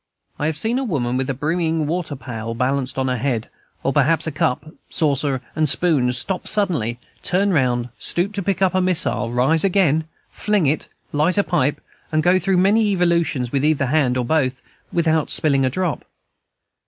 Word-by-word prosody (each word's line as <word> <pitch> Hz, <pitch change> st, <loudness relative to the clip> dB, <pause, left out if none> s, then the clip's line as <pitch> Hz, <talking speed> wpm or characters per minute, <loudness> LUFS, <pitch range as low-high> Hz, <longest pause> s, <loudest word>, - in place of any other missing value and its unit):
I 150 Hz, -, 0 dB
have 155 Hz, -1 st, -2 dB
seen 225 Hz, +9 st, 0 dB
a -, -, -2 dB
woman, 130 Hz, -, -1 dB
with 130 Hz, +1 st, -1 dB
a 135 Hz, -, -1 dB
brimming 160 Hz, +2 st, -1 dB
water 160 Hz, -1 st, -3 dB
pail 115 Hz, -3 st, -6 dB
balanced 130 Hz, +1 st, -1 dB
on 130 Hz, 0 st, 0 dB
her 125 Hz, -2 st, -1 dB
head, 120 Hz, -3 st, -2 dB, 0.3 s
or 135 Hz, -, 0 dB
perhaps 155 Hz, +3 st, +2 dB
a 160 Hz, -, -2 dB
cup, 145 Hz, +3 st, -2 dB, 0.2 s
saucer, 140 Hz, -4 st, 0 dB
and 155 Hz, -2 st, +2 dB
spoon, 140 Hz, -7 st, +2 dB
stop 180 Hz, +9 st, -1 dB
suddenly, 165 Hz, -, +1 dB, 0.2 s
turn 195 Hz, +1 st, +1 dB
round, 125 Hz, -4 st, +1 dB
stoop 185 Hz, +4 st, -1 dB
to 200 Hz, -, -3 dB
pick 195 Hz, 0 st, 0 dB
up 190 Hz, -, +2 dB
a 185 Hz, -, +2 dB
missile, 180 Hz, -9 st, +1 dB
rise 130 Hz, +7 st, +3 dB
again, 175 Hz, -6 st, +2 dB, 0.3 s
fling 210 Hz, -5 st, 0 dB
it, 145 Hz, +2 st, 0 dB, 0.2 s
light 155 Hz, +6 st, +1 dB
a 200 Hz, -, +4 dB
pipe, 145 Hz, -7 st, 0 dB, 0.3 s
and 155 Hz, 0 st, +1 dB
go 180 Hz, +1 st, +4 dB
through 190 Hz, +1 st, +1 dB
many 210 Hz, +4 st, +3 dB
evolutions 170 Hz, -, +1 dB
with 140 Hz, -1 st, 0 dB
either 150 Hz, -2 st, +2 dB
hand 130 Hz, -2 st, +1 dB
or 125 Hz, -, -1 dB
both, 130 Hz, -2 st, 0 dB, 0.3 s
without 160 Hz, -2 st, +1 dB
spilling 140 Hz, -3 st, +1 dB
a -, -, +2 dB
drop. 175 Hz, +3 st, -2 dB
155 Hz, 185 wpm, -20 LUFS, 130-180 Hz, 0.3 s, a